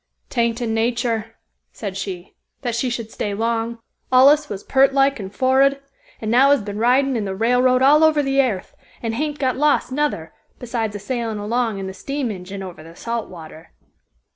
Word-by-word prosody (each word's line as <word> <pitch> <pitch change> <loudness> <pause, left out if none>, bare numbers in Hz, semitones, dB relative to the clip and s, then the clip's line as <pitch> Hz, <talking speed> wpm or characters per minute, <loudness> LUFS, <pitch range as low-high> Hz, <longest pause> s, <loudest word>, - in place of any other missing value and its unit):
"'Tain't 235 -2 0
in 225 -2 -1
natur," 225 -1 -1 0.4
said 200 -4 -6
she, 190 -2 -6 0.3
"that 240 -2 -1
she 235 +2 -1
should 230 -2 -5
stay 205 -1 -3
long. 230 +1 -1 0.3
Allus 285 +4 +5
was 200 -1 -6
peart 270 0 +3
like 275 -1 +3
and 195 -2 -6
forrud, 265 +4 +3 0.4
and 220 -1 -3
now 260 +4 +5
has 285 -6 +3
been 205 0 -5
ridin' 260 +3 +3
in 220 -3 -1
the 190 -1 -3
railroad 250 +4 +3
all 300 +3 +6
over 310 -2 +4
the 270 0 +3
airth, 220 -8 -3 0.3
and 225 -1 -2
hain't 295 +4 -2
got 260 -3 0
lost 295 -2 +2
nuther, 270 - -2 0.2
besides 230 -3 -3
a - - -4
sailin' 230 0 -3
along 225 +1 -1
in 195 - -5
the 190 - -6
steam 275 +5 -3
engine 195 0 -7
over 180 -4 -9
the 165 +1 -13
salt 230 +2 -4
water." 160 -2 -12
235 Hz, 190 wpm, -21 LUFS, 205-265 Hz, 0.4 s, all